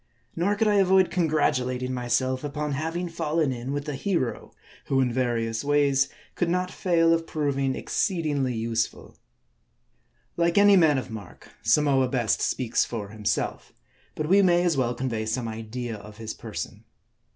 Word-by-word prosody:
Nor 190 +5 +1
could 220 +1 +1
I 205 -1 +3
avoid 190 -1 +4
congratulating 130 -7 0
myself, 130 +2 0
upon 150 0 -3
having 165 +5 -2
fallen 160 -3 0
in 125 +1 -5
with 145 +1 -3
a 150 - -2
hero, 135 -3 -2 0.3
who 135 - +1
in 125 -2 +1
various 115 -2 -1
ways, 140 -2 +2 0.2
could 175 - -1
not 180 +1 0
fail 165 -2 +2
of 165 0 -1
proving 140 -3 -1
exceed 175 -5 -1
ingly 135 -5 0
useful. 115 0 -2 1.2
Like 170 +1 +2
any 205 0 +7
man 160 -6 +5
of 130 - -4
mark, 110 -2 -10
Samoa 135 +4 +3
best 120 -4 0
speaks 120 -2 +1
for 105 -4 -5
himself; 105 -1 -3 0.4
but 155 - -2
we 195 +4 +5
may 175 -2 +4
as 175 -3 +2
well 125 -2 0
convey 115 -4 -2
some 115 +1 -2
idea 115 +1 -5
of 105 +1 -12
his 110 -1 -5
person. - - -7
135 Hz, 160 wpm, -26 LUFS, 120-165 Hz, 1.2 s, any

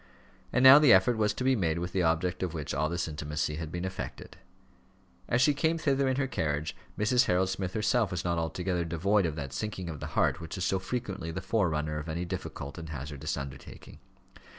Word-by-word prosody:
And 125 - +2
now 130 +2 +11
the 150 -5 +6
effort 95 +4 +5
was 105 -1 +2
to - - -3
be 130 0 +3
made 85 -7 0
with 85 +1 -3
the 95 - +1
object 85 +2 0
of 90 -3 -2
which 75 -3 -4
all 75 +3 0
this 85 +1 -2
intimacy 75 0 -3
had 80 -1 -5
been 90 +2 -3
effected. 95 0 -6 0.9
As 120 - +2
she 150 - +4
came 160 +3 +1
thither 140 -3 +1
in 130 - +1
her 140 +1 0
carriage, 75 - -2 0.2
Mrs. 125 +4 +3
Harold 95 +1 +2
Smith 95 -1 -3
herself 110 0 +2
was 90 -1 -4
not 85 -1 0
altogether 85 +2 -1
devoid 90 +4 +1
of 80 - -4
that 70 -3 -5
sinking 100 -5 -4
of 75 - -8
the - - -5
heart - - +2
which 85 +2 -6
is 90 - -2
so 95 - +1
frequently 95 -5 -4
the 80 - -4
forerunner 80 -7 0
of 75 +2 -7
any 85 +3 -2
difficult 85 -4 -6
and 80 -1 -8
hazardous 75 +1 -4
undertaking. 70 -1 -9
90 Hz, 215 wpm, -29 LUFS, 80-105 Hz, 0.9 s, now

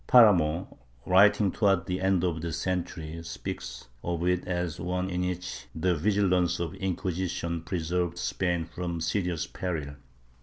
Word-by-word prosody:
Paramo, 90 -9 +5 0.3
writing 100 +1 +5
towards 95 -4 +2
the 90 0 -2
end 95 -2 +2
of 85 -3 0
the 85 0 -3
century, 85 -3 -3
speaks - - -6 0.2
of 85 0 -1
it 90 0 +1
as 90 -2 -2
one 90 +2 -2
in 90 0 -1
which 90 0 -4
the 90 +3 +2
vigilance 90 -1 +2
of 85 -2 -2
the 95 - -12
Inquisition 90 -2 -2
preserved 85 0 -1
Spain 90 -2 0
from 85 +1 -4
serious 85 0 -1
peril 75 -6 -4
90 Hz, 145 wpm, -28 LUFS, 85-95 Hz, 0.3 s, Paramo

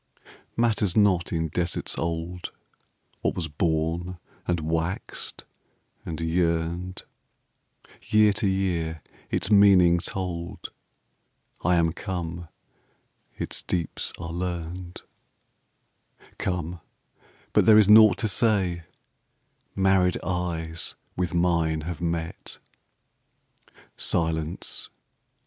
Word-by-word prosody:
Matters 110 -5 +2
not 95 -5 +3
in 80 -1 -1
deserts 85 +3 -1
old, 85 +1 -3 0.7
What - - 0
was 85 -3 -2
born, 80 +3 -1 0.3
and 85 -1 +1
waxed, 80 +3 -3 0.6
and 80 -1 -5
yearned, 85 +2 -1 1.0
Year 105 0 +4
to 100 0 0
year 85 -5 -1 0.3
its 105 - -1
meaning 95 -4 +6
told, 90 +1 -5 0.9
I 90 +2 +4
am 85 -1 +2
come, 85 -3 -5 0.9
its - - -4
deeps 85 -4 -2
are 85 -1 -5
learned, 90 0 -5 1.4
Come, 90 -2 -2 0.7
but - - +4
there 110 -1 +9
is 105 -2 +6
naught 105 -2 +8
to 110 - 0
say, 95 -6 +1 0.9
Married 95 -2 +3
eyes 85 -2 -3 0.2
with 90 -1 -1
mine 85 -2 +2
have 85 +2 -5
met. 85 -1 -3 1.4
Silence! 80 0 -2
85 Hz, 90 wpm, -26 LUFS, 80-95 Hz, 1.4 s, there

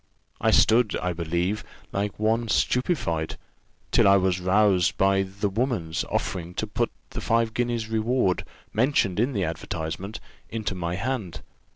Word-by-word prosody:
I - - +2
stood, 115 -1 +4
I 90 -1 -1
believe, 85 +5 -1 0.3
like 100 0 -2
one 115 +2 +1
stupified, 105 - 0 0.5
till - - +5
I 100 0 +7
was 95 -1 +1
roused 95 -1 +3
by 95 0 +3
the 95 +2 -2
woman's 100 -6 -1
offering 90 -1 -3
to - - -1
put - - -1 0.2
the - - -5
five 115 +3 +1
guineas 120 -2 -1
reward, 110 -3 +1 0.3
mentioned 110 -5 +2
in 125 +5 +1
the 100 -4 0
advertisement, 85 +4 -4 0.3
into 110 -3 -3
my 85 -1 -3
hand. 110 -3 -3
100 Hz, 145 wpm, -25 LUFS, 90-115 Hz, 0.5 s, I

